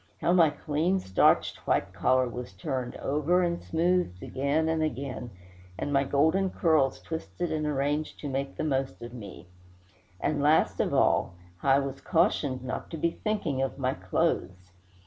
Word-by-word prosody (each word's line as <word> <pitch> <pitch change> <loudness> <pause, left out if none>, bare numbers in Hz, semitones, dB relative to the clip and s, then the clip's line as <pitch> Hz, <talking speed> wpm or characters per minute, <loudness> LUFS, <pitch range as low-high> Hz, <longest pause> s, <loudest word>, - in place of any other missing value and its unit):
how 175 - +2
my 170 -4 +6
clean, 155 +5 0
starched 95 - +3
white 95 -1 +1
collar 130 +7 +2
was 120 -4 -7
turned 125 +6 -4
over 150 +6 +1
and 170 -1 -1
smoothed 165 - 0
again 140 +4 0
and 160 0 +1
again, 135 -4 -3 0.5
and 145 - -3
my 135 0 +4
golden 160 +8 +2
curls 155 -7 +2
twisted 165 +1 -4
and 155 -1 -1
arranged 145 +1 -1
to 145 - -5
make 135 0 -3
the - - -2
most 135 -3 -1
of 120 0 -8
me! 105 -7 -9 0.7
and, 145 +6 0
last 150 +2 +3
of - - +1
all, 85 - +2 0.2
how 135 - -2
I - - +6
was 135 -1 -3
cautioned 145 -6 +1
not 130 - -5
to 165 - -5
be 170 +2 +1
thinking 175 -10 -2
of 135 0 -2
my 130 -1 0
clothes. 90 0 -2
140 Hz, 165 wpm, -28 LUFS, 130-160 Hz, 0.7 s, my